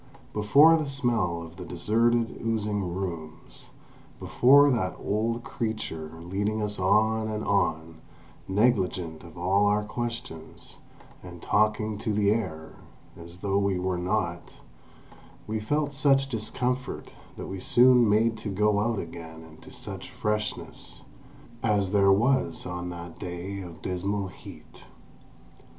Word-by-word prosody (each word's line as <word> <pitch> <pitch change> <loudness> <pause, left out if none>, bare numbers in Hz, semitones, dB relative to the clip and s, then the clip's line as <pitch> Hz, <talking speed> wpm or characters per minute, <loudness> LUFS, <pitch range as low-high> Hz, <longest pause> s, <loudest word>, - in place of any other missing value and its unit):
Before 140 +11 +6
the 155 -2 -2
smell 115 -11 0
of 85 +1 -12
the 90 - -7
deserted, 115 +7 +1
oozing 105 -4 -1
rooms, 85 -4 -6 0.5
before 140 +3 +5
that 105 -7 0
old 115 +3 -1
creature 110 -9 -4
leading 100 +5 -1
us 105 -1 -2
on 110 +3 +2
and 110 0 -3
on, 80 -5 0 0.5
negligent 95 -6 +1
of 85 -1 -13
all 95 +4 +2
our 105 +1 +2
questions, 115 -7 -6 0.4
and 90 -1 -10
talking 105 +2 +1
to 110 - -2
the 100 -1 +3
air, 80 -8 -3 0.4
as 85 +1 -11
though 100 -1 +1
we 100 -2 +1
were 90 0 -1
not, 90 -2 -2 0.9
we 110 0 -2
felt 145 +6 -1
such 135 -1 +3
discomfort 125 +2 -3 0.3
that - - -6
we 95 - -6
soon 125 +2 +5
made 110 +2 +2
to 110 - -5
go 105 +1 +2
out 115 +1 0
again 80 -2 -8
into 80 -1 -15
such - - -7
freshness 105 0 -4 0.6
as 100 -4 +1
there 100 -1 +5
was 110 -4 +2
on 90 0 -4
that 85 -1 -9
day 90 +3 -5
of 85 -3 -10
dismal 95 +2 -2
heat. - - -14
105 Hz, 130 wpm, -27 LUFS, 90-115 Hz, 0.9 s, Before